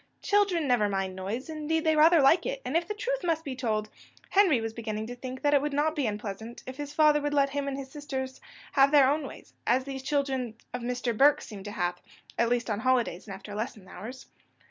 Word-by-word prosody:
Children 390 -7 +2
never 235 -5 +3
mind 195 -1 -2
noise 200 +7 -4
indeed, 315 0 -1
they 315 -1 +3
rather 315 0 +6
like 335 - +5
it; - - -3
and, 265 - -3
if 335 0 +2
the 420 - -3
truth - - -2
must 325 -2 0
be 270 -2 -4
told, 220 -4 -1 0.4
Henry 380 - +5
was 225 0 -4
beginning 220 -2 -4
to 245 +2 -7
think 255 +1 -7
that 290 0 +3
it 285 - +5
would 295 0 -2
not 305 +2 +1
be 285 -6 0
unpleasant 215 +2 -5
if 260 +1 -8
his 290 -1 -5
father 300 0 +4
would 290 0 -1
let 275 -1 +3
him 285 0 -2
and 275 -1 -2
his 265 -1 -7
sisters 265 -3 -5 0.3
have 275 0 +5
their 285 -2 +6
own 290 +1 0
ways, - - -12
as 255 +2 +3
these 270 0 -6
children 265 -4 -1 0.2
of 250 - -3
Mr. 245 -1 -2
Burke 280 +5 +5
seemed 205 -3 -9
to 205 - -5
have, 180 -4 -2 0.4
at 235 0 +3
least 240 -1 0
on 210 -2 -1
holidays 240 -7 +1
and 195 - -6
after 200 +2 -10
lesson 215 -2 -5
hours. 245 +7 -9
265 Hz, 235 wpm, -28 LUFS, 225-295 Hz, 0.4 s, rather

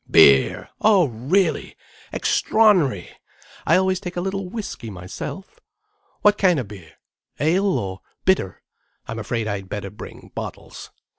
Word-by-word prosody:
"Beer! 70 -1 +5
Oh 205 -5 +5
really! 155 - 0 0.4
Extraor'nary! 215 - +2 0.6
I - - +5
always 185 0 +2
take 180 -2 -7
a - - 0
little 195 0 -3
whiskey 200 - -6
myself. 95 - -8 0.6
What 210 0 +4
kind 180 -4 +4
of 120 - -4
beer? 90 -6 -12 0.5
Ale?—or 160 - +1 0.3
bitter? 185 - +1 0.4
I'm 115 0 -5
afraid 110 0 -2
I'd 100 -2 -4
better 100 -2 -5
bring 105 - -11
bottles. - - -8
170 Hz, 125 wpm, -22 LUFS, -, 0.6 s, Beer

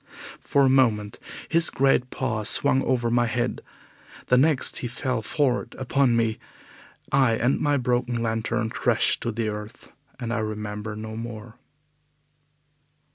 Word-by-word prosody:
For 140 - +1
a - - +5
moment 115 -6 +2 0.3
his 165 0 +3
great 135 -2 +2
paws 115 -6 -1
swung 135 -2 +5
over 120 -2 0
my 120 0 +2
head. 120 +1 -2 0.7
The 125 - +5
next 145 -1 +2
he 125 - -3
fell 125 -1 -3
forward 130 +2 -1
upon 130 -1 +1
me, 115 -1 0 0.7
I 135 -4 +3
and 120 +4 +1
my 145 -1 +1
broken 125 -1 -1
lantern 115 0 -2
crashed - - +1
to 115 - -2
the 110 0 -2
earth, 105 0 -8 0.3
and 115 -1 -3
I 115 - -1
remember 105 0 -5
no 110 +1 -7
more. 115 0 -8
120 Hz, 140 wpm, -24 LUFS, 110-130 Hz, 0.7 s, a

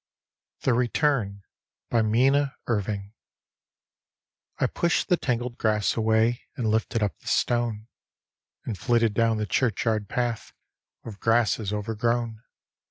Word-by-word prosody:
THE 130 - +2
RETURN: 120 -5 0 0.5
minna 130 +5 +3
ntviNo 100 -3 -2 1.5
I - - +1
pushed 170 +3 0
the 180 - +4
tangled 120 -3 -2
grass 105 -2 +1
away 110 +2 +2 0.2
And 120 - -2
lifted 110 0 0
up 100 - -2
the - - -17
stone, 120 -3 0 0.8
And 110 - -3
flitted 115 -3 +2
down 115 0 +2
the 105 - -1
churchyard 110 -1 0
path 120 -2 -2 0.5
With 105 -3 -9
grasses 115 -2 +2
overgrown. 115 +2 -1
115 Hz, 110 wpm, -26 LUFS, 105-120 Hz, 1.5 s, the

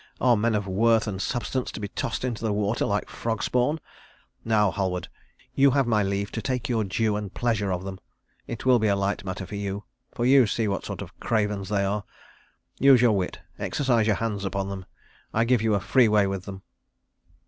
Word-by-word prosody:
Are 125 -2 +4
men 110 +1 +1
of 105 -1 -1
worth 110 +4 +3
and 100 -3 -4
substance 125 +3 -2
to - - -6
be 105 - -3
tossed 115 - -3
into 120 -3 -3
the 110 - +1
water 105 +2 0
like 105 0 -1
frog 115 -2 -3
spawn? 125 +6 +1 0.6
Now, 105 -3 +3
Halward, 90 -3 -2 0.4
you 140 +1 +5
have 135 0 +2
my 110 -3 +2
leave 100 0 -1
to 110 - -4
take 125 +2 -2
your 115 -3 +1
due 105 +2 0
and 105 -2 -4
pleasure 110 -4 0
of 90 0 -2
them. 95 -1 -6 0.5
It 115 +1 -6
will 125 -2 +5
be 110 - +2
a 100 - +3
light 100 0 -1
matter 95 0 -5
for - - -11
you, 100 0 -3 0.3
for 120 - -2
you 130 -2 +6
see 110 +1 0
what 100 -2 -2
sort - - -5
of - - -14
cravens 105 -4 -1
they 100 -2 +1
are. 100 +1 -1 0.8
Use 135 -1 +7
your 120 -3 +4
wit, 90 -2 -3 0.2
exercise 115 +3 +1
your 105 - +3
hands 105 -2 -2
upon 95 0 -2
them; 95 -2 -6 0.5
I 115 - +4
give 120 -1 +2
you 110 -2 +2
a - - +1
free 125 +5 +4
way 105 -1 +4
with 95 -1 -3
them." 95 -1 -8
105 Hz, 215 wpm, -26 LUFS, 100-115 Hz, 0.8 s, Use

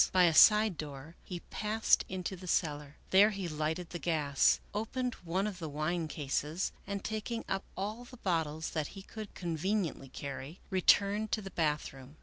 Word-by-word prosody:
By 185 -1 +5
a 170 -2 +5
side 210 +1 +7
door 145 +2 -7
he 175 -2 -6
passed 215 +1 +2
into 185 0 -3
the 185 0 -10
cellar. 150 -4 -1 0.2
There 200 +3 +7
he 195 -4 -4
lighted 160 +2 -2
the 175 - -4
gas, 150 -5 +3
opened 245 +4 -2
one 180 +4 0
of 200 -4 -4
the 160 -3 -4
wine 155 +3 -1
cases, 150 +4 -2 0.2
and, 200 -1 -3
taking 220 +2 -3
i:p 195 0 -1
all 215 +5 -3
the 250 - -13
bottles 160 -6 -1
that 155 -3 -1
he 195 - -8
could 215 0 -9
conveniently 170 -3 -1
carry, 140 +5 -7
returned 200 +3 +3
to 215 - +1
the 195 - -7
bathroom. 150 -3 -2
175 Hz, 170 wpm, -32 LUFS, 155-200 Hz, 0.2 s, side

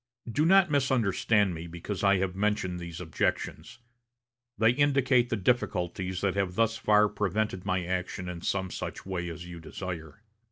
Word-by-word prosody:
Do 145 +8 +1
not 190 -2 +5
misunderstand 110 -7 +2
me 85 +1 -6
because 85 +4 -5
I 100 0 +5
have 95 -1 -1
mentioned 100 -3 0
these 85 -1 -7
objections. 80 +3 -2 0.8
They 110 +1 +5
indicate 135 -2 +3
the - - 0
difficulties 95 -4 -1
that 100 -1 +1
have 95 -2 -1
thus 115 +1 +2
far 105 0 +4
prevented 105 -1 -2
my 95 -2 0
action 90 +1 -3
in 90 -2 -6
some 95 0 -1
such - - -6
way 90 -2 -3
as 85 +1 -7
you 85 -1 -9
desire. 85 +2 -7
95 Hz, 160 wpm, -29 LUFS, 90-110 Hz, 0.8 s, not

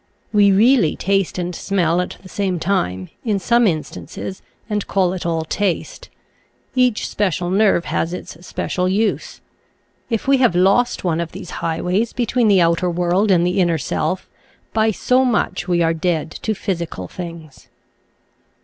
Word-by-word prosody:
We 205 -1 +5
really 220 - +4
taste 195 -2 0
and 180 0 -3
smell 175 -2 +1
at 180 - -5
the - - -11
same 190 -1 -1
time, 95 - -1
in 215 -4 0
some 235 +4 +3
instances, 175 +2 -4 0.3
and 210 -2 -2
call 185 -2 +1
it 180 -2 -4
all 165 -1 0
taste. 200 - -2 0.6
Each 250 -4 +2
special 180 -3 -1
nerve 195 -3 +3
has 165 - -1
its 175 -2 -8
special 180 0 -2
use. 210 +3 -1 0.7
If 230 +1 -2
we 275 0 +5
have 250 -9 +3
lost 195 +7 +3
one 170 -3 0
of 170 -1 -4
these 185 -1 -8
highways 180 +7 -1
between 240 -1 +1
the 195 -3 +5
outer 170 +2 +2
world 180 +4 +1
and 175 -2 +4
the 180 +2 0
inner 170 -2 +2
self, 160 +4 -2 0.5
by 220 0 +3
so 250 +5 +2
much 220 -6 0
we 175 -1 +2
are 165 0 +2
dead 165 -1 -1
to 220 +5 -3
physical 170 - -4
things. 165 - -9
185 Hz, 160 wpm, -20 LUFS, 170-210 Hz, 0.7 s, We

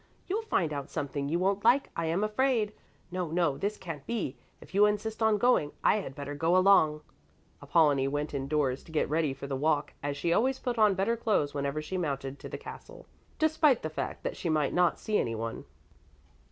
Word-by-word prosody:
You'll 405 +4 -1
find 170 - 0
out 140 -1 -5
something 140 0 -3
you 165 - +1
won't 195 +2 0
like, 250 +5 +4
I 165 -1 -1
am 170 +5 0
afraid. 215 -1 +1 0.4
No, 180 -2 -2
no, 165 -3 +1
this 205 +5 -2
can't 160 -6 -7
be. 215 - -2 0.2
If - - -15
you 205 +2 +6
insist 215 +2 -2
on 220 -1 +4
going, 205 -10 +2
I - - +4
had 135 -10 -5
better 145 +1 -5
go 165 +5 +2
along." 170 -6 +5 0.6
Apollonie 145 -5 +3
went 145 +2 -2
indoors 140 -1 -1
to - - -13
get 155 - +1
ready 155 -2 +1
for 135 +1 -7
the 140 -1 -3
walk, 150 +1 0
as 145 0 -3
she 170 +4 +1
always 260 +7 +2
put 245 -3 -3
on 210 -3 +5
better 200 +5 +1
clothes 210 -11 0
whenever 140 +1 -2
she 185 +4 -3
mounted 140 -4 -3
to - - -8
the - - -5
castle, - - -11 0.3
despite 310 -4 +3
the 155 - -3
fact - - -4
that - - -3
she 170 - -3
might 155 -3 +1
not 175 -1 +3
see 215 -1 0
anyone. 115 0 -3
165 Hz, 205 wpm, -29 LUFS, 145-210 Hz, 0.6 s, you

